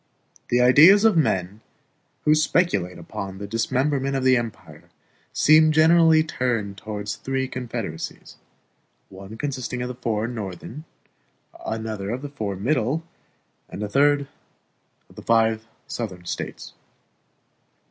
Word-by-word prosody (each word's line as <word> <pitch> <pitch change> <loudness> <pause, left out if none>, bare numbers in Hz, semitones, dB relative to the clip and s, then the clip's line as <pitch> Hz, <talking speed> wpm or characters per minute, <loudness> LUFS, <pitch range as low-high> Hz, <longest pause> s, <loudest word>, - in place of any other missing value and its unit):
The 120 +1 +2
ideas 160 - +7
of 220 -4 +5
men 100 - 0 0.6
who 150 - +5
speculate 155 - +1
upon 95 -1 -7
the 100 - -6
dismemberment 135 +6 -1
of 135 - -1
the 130 0 +5
empire 115 -3 -6 0.4
seem 155 +1 +5
generally 160 0 +5
turned 115 -9 -2
toward 105 -1 -6
three 130 +5 -2
confederacies 115 -10 -6 0.7
one 95 +3 -11
consisting 130 -2 -4
of - - -3
the - - -4
four 115 -3 -2
Northern, 115 - -7 0.8
another 110 -3 -4
of 125 +5 -4
the 145 - -5
four 110 -8 -4
Middle, 130 - 0 0.7
and 105 - -6
a - - -2
third 140 +4 +2 0.8
of - - -21
the - - -8
five 115 -1 +1 0.2
Southern 95 -7 -6
States. - - -6
120 Hz, 125 wpm, -23 LUFS, 105-145 Hz, 0.8 s, ideas